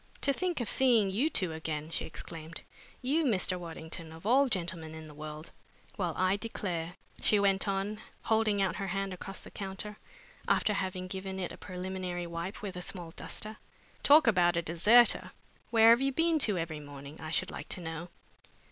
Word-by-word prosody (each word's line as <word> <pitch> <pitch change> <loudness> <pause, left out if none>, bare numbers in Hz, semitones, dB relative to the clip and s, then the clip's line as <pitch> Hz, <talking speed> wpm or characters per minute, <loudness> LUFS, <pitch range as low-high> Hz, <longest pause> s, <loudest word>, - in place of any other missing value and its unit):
"To 280 - +2
think 360 0 -1
of 240 - -2
seeing 235 -7 +4
you 250 +11 +2
two 185 - +2
again!" 155 -1 -4
she - - -2
exclaimed. 160 0 -8 0.4
"You, 295 +6 +2
Mr. 185 -8 +2
Waddington, 165 -1 -7
of 165 +3 -12
all 265 +5 +5
gentlemen 170 -5 -2
in 160 0 -8
the 155 - -11
world! 155 +1 -8 0.4
Well, 175 -6 -1
I 185 +2 +3
declare!" 180 -6 -3 0.3
she 210 - +4
went 195 0 +2
on, 200 +2 -1 0.2
holding 220 -3 +2
out 190 - 0
her 195 - -3
hand 195 +1 -2
across 195 +2 -8
the - - -12
counter, 200 +2 -6 0.5
after 210 - +3
having 185 -2 -2
given 190 +1 -5
it 185 -2 -3
a - - -8
preliminary 180 -1 -4
wipe 170 +4 -5
with 195 -2 -4
a 180 - -5
small 175 -2 -6
duster. 215 +5 -6 0.4
"Talk 300 +1 +7
about 175 -6 +4
a 170 - +1
deserter! 210 +9 +4 0.4
Where 225 -1 +7
have 235 +2 +6
you 275 0 +2
been 325 +3 +2
to 200 - +1
every 160 -2 -3
morning, 145 0 -10
I 155 - -5
should 185 +3 0
like - - -7
to 180 - -3
know?" 165 +1 -5
185 Hz, 185 wpm, -31 LUFS, 165-215 Hz, 0.5 s, Talk